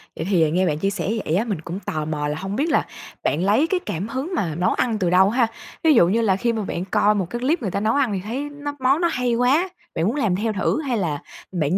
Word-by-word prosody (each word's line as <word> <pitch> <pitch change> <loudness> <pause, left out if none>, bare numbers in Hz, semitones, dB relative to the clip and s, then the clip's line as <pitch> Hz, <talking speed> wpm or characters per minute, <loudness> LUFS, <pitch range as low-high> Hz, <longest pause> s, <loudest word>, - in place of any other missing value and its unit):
Vậy - - -4
thì 165 -6 +3
nghe 185 +3 +2
bạn 150 -2 -1
chia 195 - +1
sẻ 195 -2 -3 0.2
vậy 155 - 0
á, 200 - +2
mình 200 -9 -3
cũng 170 +4 -5
tò 155 -6 -3
mò 150 -1 -2
là 150 +1 -2
hông 195 +4 -4
biết 295 +8 0
là - - +2 0.4
bạn 160 +4 +1
lấy 215 +11 +3
cái 370 +1 0
cảm 180 +5 -3
hứng 265 +10 -4
mà 165 - -1
nấu 180 +3 +1
ăn 230 -3 0
từ 180 -3 +1
đâu 185 +2 +5
ha? 235 +1 +2 0.4
Ví 320 -2 +6
dụ 170 - +6
như 220 +6 +2
là 200 -4 +3
khi 235 +4 0
mà 220 - -2
bạn 180 -2 -3
coi 205 +2 +3
một 195 -3 0
cái 240 - -4
clip 285 +7 +1
người 200 -6 -2
ta 200 - -1
nấu 215 +2 +1
ăn 265 -7 +2
thì 195 - -1
thấy 260 +8 -4
nó 290 0 -5
món 265 +5 +2
nó 345 - +4
hay 250 -4 0
quá, 270 +10 +3 0.3
bạn 160 - 0
muốn 230 - 0
làm 220 -11 +1
theo 215 +3 -1
thử 205 +9 0
hay 260 -6 -1
là 160 -8 -1 0.3
bạn 170 -1 0
205 Hz, 290 wpm, -22 LUFS, 180-255 Hz, 0.4 s, Ví